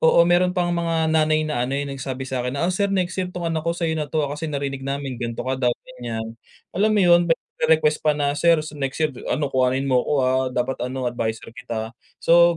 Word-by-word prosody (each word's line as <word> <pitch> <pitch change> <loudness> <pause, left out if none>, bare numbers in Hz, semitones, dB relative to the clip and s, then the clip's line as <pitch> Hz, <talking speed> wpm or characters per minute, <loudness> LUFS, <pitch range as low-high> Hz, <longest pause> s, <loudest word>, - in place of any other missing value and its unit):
oo 160 - +5
meron 180 +1 +3
pang 175 -1 +1
mga 165 -2 0
nanay 155 0 +3
na 120 -6 -1
ano, 135 - -1
yung 140 -1 -3
nagsabi 130 -1 -5
sa 130 -1 -3
akin 125 +3 -3
na, 165 - 0
"Oh 185 - +1
sir, 200 +2 +1
next 185 -2 0
year, 185 - -2
tong 180 -1 -6
anak 165 -1 0
ko 170 +2 -2
sa'yo 165 -2 0
na 150 -2 -2
'to 155 -2 0
kasi 150 +3 -4
narinig 140 -2 -3
namin 135 -2 -4
ganto 115 0 -3
ka 130 - -1
daw, 125 - +3 0.3
ganyan." 115 -2 -4 0.4
Alam 210 +4 +2
mo - - +4
yun? 175 0 +7
May 165 - +4 0.4
request 150 -1 +1
pa 150 -1 +2
na, 145 -1 +1
"Sir, 170 +3 +4 0.2
next 135 -1 -2
year 150 - 0 0.2
ano 140 +1 -1
kuhanin 130 +1 +2
mo 130 -2 +3
ko - - -3
ah, 130 0 +2
dapat 125 +1 -2
ano 130 +1 -3
adviser 115 -2 -3
kita," 115 -3 -5 0.2
So 170 0 +5
145 Hz, 235 wpm, -23 LUFS, 130-165 Hz, 0.4 s, yun